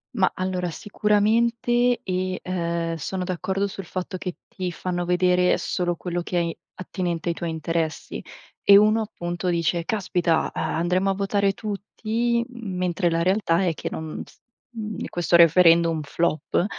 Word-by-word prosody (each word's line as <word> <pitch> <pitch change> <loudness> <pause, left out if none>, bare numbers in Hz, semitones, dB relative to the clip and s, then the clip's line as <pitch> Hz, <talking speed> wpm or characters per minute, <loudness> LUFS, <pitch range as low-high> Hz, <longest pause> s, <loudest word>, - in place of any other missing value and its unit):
Mah, 190 -5 +3
allora 185 -1 -2
sicuramente, 230 +6 +1
e 185 0 -2
ehm, 170 -2 -2
sono 180 +4 -3
d'accordo 190 +2 -1
sul 195 -1 -7
fatto 185 +2 -4
che 180 -1 -5
ti 185 -2 -4
fanno 175 -1 -3
vedere 180 0 +3
solo 175 -1 -1
quello 175 0 -3
che 175 0 -1
è - - -4 0.2
attinente 175 -2 -3
ai - - +1
tuoi 170 -1 -3
interessi. 160 0 -3 0.4
E 200 - +7
uno 215 +2 +4
appunto 175 -3 -5
dice: 170 0 0
"Caspita, 180 -6 0
uhm, - - -3
andremo 180 +3 +1
a - - +2
votare 200 0 +1
tutti, 225 +3 -2
mentre 185 -6 -1
la 165 0 0
realtà 190 -2 +2
è 175 -3 +1
che - - -6
non 160 -1 -5
s - - -20 0.3
uhm, 215 -2 -5
questo 175 0 +2
referendum 165 -1 +5
flop; 155 +3 0
180 Hz, 150 wpm, -24 LUFS, 170-200 Hz, 0.4 s, E